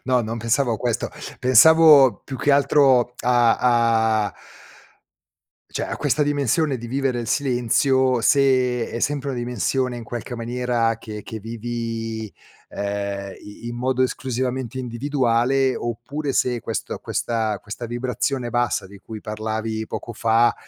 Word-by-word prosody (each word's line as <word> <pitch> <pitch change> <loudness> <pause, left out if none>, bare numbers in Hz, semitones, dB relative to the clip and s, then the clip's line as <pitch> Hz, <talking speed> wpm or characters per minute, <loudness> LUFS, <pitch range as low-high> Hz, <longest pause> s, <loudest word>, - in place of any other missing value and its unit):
no, 125 -1 +2
non 115 +1 -4
pensavo 120 +2 +1
a - - -3
questo, 120 -1 -2 0.3
pensavo 145 +1 +7
più 135 - -6
che 145 - +2
altro 135 -3 +4
a 120 -1 +4
a 115 -4 +2 1.4
cioè, - - -3
a - - -4
questa 150 +3 +1
dimensione 145 0 +1
di 120 - -7
vivere 130 0 -1
il 115 - -4
silenzio, 130 0 +2
se 130 -3 +2
è 115 - -5
sempre 145 0 -1
una 125 - -4
dimensione, 125 +1 -1
in 115 - -7
qualche 120 +1 -6
maniera, 120 -1 -1
che 105 -2 -8
che 110 - -7
vivi, 115 -1 -5 0.4
ehm, 100 -1 -4
i 105 +3 -11
in 120 - -4
modo 130 +1 0
esclusivamente 130 -1 -2
individuale 130 +1 +1
oppure 135 +5 -4
se 125 -2 0
questo 115 0 -4
questa 110 -3 -2
questa 110 +4 -7
vibrazione 125 +1 -2
bassa 120 -4 0
di 100 +1 -14
cui 110 0 -9
parlavi 110 0 -4
poco 120 - -6
fa, 115 +1 +3
120 Hz, 140 wpm, -22 LUFS, 115-130 Hz, 1.4 s, pensavo